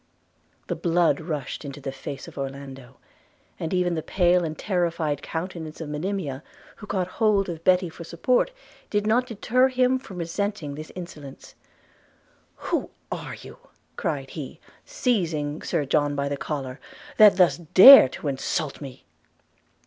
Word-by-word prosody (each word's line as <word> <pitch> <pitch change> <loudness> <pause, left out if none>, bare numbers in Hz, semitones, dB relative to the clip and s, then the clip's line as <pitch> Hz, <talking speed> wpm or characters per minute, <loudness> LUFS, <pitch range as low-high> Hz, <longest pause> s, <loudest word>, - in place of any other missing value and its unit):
The - - -3
blood 170 -4 +2
rushed 155 -4 -5
into 140 -1 -8
the 135 -1 -5
face 135 +1 -8
of - - -12
Orlando; 135 -2 -8 0.6
and 160 - -4
even 180 -1 +1
the 160 - -2
pale 180 +1 +2
and 155 -1 -4
terrified 170 -6 -1
countenance 160 -2 -6
of 160 -3 -6
Monimia, 150 -3 -3 0.4
who 210 - -11
caught 185 -2 -1
hold 205 0 +1
of 165 -1 -6
Betty 180 0 +3
for 170 +1 -10
support, 175 - +1 0.4
did 205 0 0
not 240 +4 +2
deter 245 +3 +2
him 255 0 +2
from 195 -8 -11
resenting 170 -2 -3
this 155 +2 -9
insolence. 155 -6 -10 1.0
'Who - - -2 0.2
are - - -5
you,' - - -13 0.4
cried 140 -4 -3
he, 145 -5 -8 0.3
seizing 170 - -1
Sir 145 - -1
John 145 +1 +1
by 140 0 -1
the 140 - -2
collar, 135 -2 -5 0.4
'that 210 -3 +7
thus 180 -3 +4
dare 185 - +9
to 145 - -7
insult 140 +2 -2
me?' 135 -3 -10
165 Hz, 150 wpm, -25 LUFS, 145-195 Hz, 1.0 s, dare